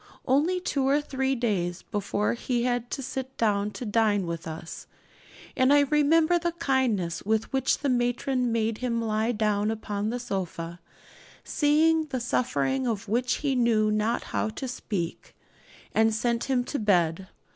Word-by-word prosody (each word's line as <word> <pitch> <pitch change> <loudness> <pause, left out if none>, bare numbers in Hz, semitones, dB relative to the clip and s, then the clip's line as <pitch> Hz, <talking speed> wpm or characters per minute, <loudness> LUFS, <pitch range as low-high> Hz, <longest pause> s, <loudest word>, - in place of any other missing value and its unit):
Only 310 +8 +2
two 275 -6 -1
or 280 +2 +4
three 270 -2 -1
days 185 -7 -1
before 205 0 -1
he 240 0 -1
had 245 -1 -1
to 275 - -4
sit 265 +1 -5
down 205 -2 +1
to 250 - -6
dine 210 -3 +2
with 170 -1 -5
us; 160 +1 -7 0.7
and 260 +1 +3
I 290 0 +6
remember 310 +4 +3
the 340 0 -1
kindness 245 - 0
with 220 +4 -1
which 265 - +2
the 290 - -2
matron 245 0 0
made 225 -1 0
him 240 -2 -1
lie 220 0 0
down 210 -2 +1
upon 210 -1 -3
the 240 - -2
sofa, 175 -6 -4 0.6
seeing 315 +2 +3
the 265 -4 -3
suffering 255 +2 0
of 220 -3 -2
which 245 +4 +1
he 275 - +2
knew 230 -4 +2
not 215 +3 0
how - - 0
to 260 +5 -5
speak, 195 -8 -5 0.6
and 220 0 +4
sent 235 +1 0
him 260 -2 +1
to 285 - -3
his - - -4
bed. 180 -2 +2
235 Hz, 165 wpm, -27 LUFS, 210-265 Hz, 0.7 s, I